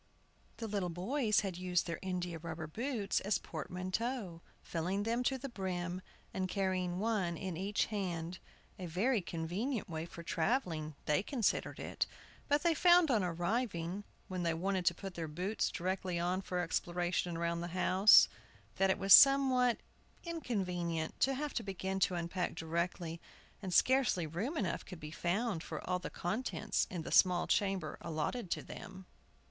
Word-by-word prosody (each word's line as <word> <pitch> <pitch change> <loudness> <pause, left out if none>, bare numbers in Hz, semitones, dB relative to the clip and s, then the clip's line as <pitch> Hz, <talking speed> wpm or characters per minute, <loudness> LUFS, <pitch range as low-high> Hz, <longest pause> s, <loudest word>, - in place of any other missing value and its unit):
The 225 - -4
little 200 -4 -1
boys 215 - +1
had 190 -4 -4
used 180 -1 0
their 170 -1 -4
india 180 -3 -3
rubber 160 0 -5
boots 225 - -1
as 205 +1 +1
portmanteaux, 185 - -4 0.2
filling 180 +5 -2
them 230 +3 0
to 265 - +2
the 270 +2 -5
brim, 185 -5 -3 0.3
and 185 -1 -2
carrying 185 -2 0
one 195 -5 0
in 185 -2 -4
each 195 +4 0
hand, 180 -4 -3 0.4
a 180 - -4
very 205 +8 +1
convenient 190 - -3
way 160 -1 -4
for 170 0 -10
travelling 165 - -1
they 150 +3 +2
considered 230 0 -1
it; - - -2 0.4
but 290 +2 +2
they 340 -1 +4
found 345 -1 +6
on 220 -5 +3
arriving 180 +1 -1 0.2
(when 185 -1 -3
they 170 -1 +1
wanted 185 +1 -1
to 175 - +4
put 195 0 -7
their 165 -2 -4
boots 180 +8 -1
directly 185 0 -2
on 180 +2 0
for 180 -2 -2
exploration 175 0 -1
round 170 0 -1
the 175 - -3
house), 185 +3 +6 0.5
that 195 0 +3
it 190 - +3
was 195 0 +6
somewhat 260 -3 +7 0.5
inconvenient 180 - -2
to 270 +1 +3
have 295 +2 -3
to - - -1
begin 190 -2 -3
to 185 -1 +2
unpack 175 +1 -2
directly, 165 0 -2 0.4
and 190 -3 -4
scarcely 250 -4 +3
room 195 - -3
enough 185 -5 -1
could 180 -3 -10
be 150 0 -7
found 180 +3 -1
for - - -6
all 180 0 +1
the 180 - -5
contents 215 +3 -1
in 175 -3 -4
the - - -6
small 180 -1 +5
chamber 195 -6 0
allotted 170 +7 -3
to - - -2
them. 190 -1 -9
185 Hz, 165 wpm, -34 LUFS, 170-215 Hz, 0.5 s, somewhat